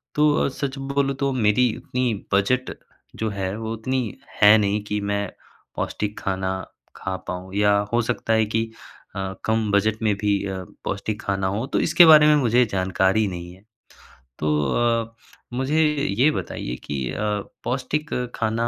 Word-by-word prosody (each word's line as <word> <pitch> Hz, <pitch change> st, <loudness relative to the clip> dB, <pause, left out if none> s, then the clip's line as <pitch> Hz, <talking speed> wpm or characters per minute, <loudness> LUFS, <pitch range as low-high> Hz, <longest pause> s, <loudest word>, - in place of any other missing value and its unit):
तो 150 Hz, 0 st, +4 dB, 0.2 s
अ, -, -, +1 dB
सच 135 Hz, 0 st, -4 dB
बोलूँ, 135 Hz, 0 st, -1 dB
तो 140 Hz, +1 st, 0 dB
मेरी 120 Hz, 0 st, +3 dB
इतनी 125 Hz, +1 st, -2 dB, 0.2 s
बजट 125 Hz, +7 st, +2 dB, 0.5 s
जो 110 Hz, -, -1 dB
है, 95 Hz, -1 st, -3 dB
वो 110 Hz, 0 st, -4 dB
उतनी 120 Hz, -1 st, -2 dB, 0.2 s
है 105 Hz, +1 st, +9 dB
नहीं 105 Hz, 0 st, +1 dB
कि 105 Hz, 0 st, -2 dB
मैं 100 Hz, 0 st, -1 dB, 0.5 s
पौष्टिक 105 Hz, 0 st, -3 dB
खाना 95 Hz, 0 st, -2 dB, 0.4 s
खा 95 Hz, -1 st, -4 dB
पाऊँ 90 Hz, +1 st, -6 dB
या 105 Hz, 0 st, +4 dB, 0.2 s
हो 120 Hz, -, +4 dB
सकता 115 Hz, 0 st, -1 dB
है 110 Hz, 0 st, +3 dB
कि 110 Hz, +1 st, 0 dB, 0.5 s
अ, 95 Hz, -1 st, -3 dB
कम 110 Hz, -1 st, +1 dB
बजट 105 Hz, +2 st, +1 dB
में 105 Hz, -2 st, +2 dB
भी 100 Hz, -1 st, 0 dB
अ, 95 Hz, -1 st, -4 dB, 0.2 s
पौष्टिक 105 Hz, +2 st, -3 dB
खाना 95 Hz, -1 st, -1 dB
हो, 105 Hz, +6 st, -2 dB
तो -, -, 0 dB
इसके 175 Hz, -, +6 dB
बारे 155 Hz, -2 st, +8 dB
में 150 Hz, -, +6 dB
मुझे 125 Hz, -3 st, +3 dB
जानकारी 95 Hz, +2 st, +1 dB
नहीं 90 Hz, -2 st, -6 dB
है। 95 Hz, +2 st, -19 dB, 0.8 s
तो 75 Hz, -, 0 dB, 0.2 s
अ, 115 Hz, -, 0 dB, 0.4 s
मुझे 135 Hz, +5 st, +1 dB, 0.4 s
ये 140 Hz, +5 st, +6 dB
बताइए 60 Hz, -, -4 dB
कि 65 Hz, -3 st, -3 dB
अ, -, -, -5 dB, 0.5 s
पौष्टिक 140 Hz, +4 st, -2 dB, 0.2 s
खाना 115 Hz, +1 st, 0 dB
110 Hz, 165 wpm, -23 LUFS, 100-125 Hz, 0.8 s, है